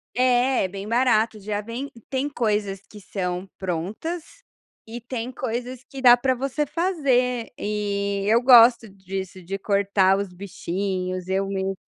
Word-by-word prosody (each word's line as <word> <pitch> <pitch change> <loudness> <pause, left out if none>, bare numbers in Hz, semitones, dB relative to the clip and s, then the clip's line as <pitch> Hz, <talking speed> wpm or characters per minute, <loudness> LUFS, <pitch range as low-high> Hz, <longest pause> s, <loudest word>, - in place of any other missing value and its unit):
É, 250 -2 +3
bem 195 +2 -7
barato, 225 -2 +2
já 205 +1 -3
vem 235 +6 -6
e 230 - -15
tem 265 +5 -2
coisas 210 -7 -1
que 210 - -12
são 185 -2 -4
prontas 195 - -3 0.6
e 230 +2 -7
tem 245 0 -5
coisas 250 0 -4
que 270 - -8
dá 245 -1 +8
para 260 +1 +1
você 275 +4 -2
fazer, 265 -8 0
e 200 -1 -2
eu 225 +3 +4
gosto 235 -2 +7
disso, 190 -1 -7
de 195 +3 -5
cortar 200 -1 +2
os 200 -2 -4
bichinhos, 185 0 -4
eu 190 +1 0
me 195 0 -2
215 Hz, 145 wpm, -24 LUFS, 195-250 Hz, 0.6 s, dá